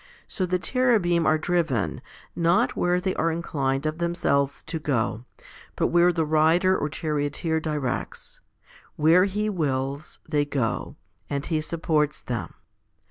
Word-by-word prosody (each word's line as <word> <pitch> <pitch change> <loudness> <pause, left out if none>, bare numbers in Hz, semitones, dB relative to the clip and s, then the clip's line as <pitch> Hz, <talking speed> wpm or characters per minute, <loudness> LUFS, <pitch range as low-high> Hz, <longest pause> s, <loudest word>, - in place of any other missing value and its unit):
So 185 -3 -2
the 180 +1 +1
Cherubim 195 -7 +2
are 155 - +4
driven, 155 - -1 0.3
not 170 0 +2
where 175 0 +1
they 185 +1 -1
are 165 +1 +1
inclined 140 -4 -2
of 155 +2 -2
themselves 140 -5 0
to 165 - -4
go, 120 -5 -1 0.5
but - - +1
where 175 +1 +4
the 165 -2 0
Rider 160 +5 +3
or 150 - -1
Charioteer 150 +1 -1
directs. 150 -5 -4 0.5
Where 165 +5 +5
He 205 +2 -1
wills, 140 -6 -2
they 150 -2 +1
go; 140 -1 -2 0.3
and 140 0 -2
He 155 -2 0
supports 155 -2 0
them. 120 -1 -4
160 Hz, 135 wpm, -25 LUFS, 145-175 Hz, 0.5 s, Where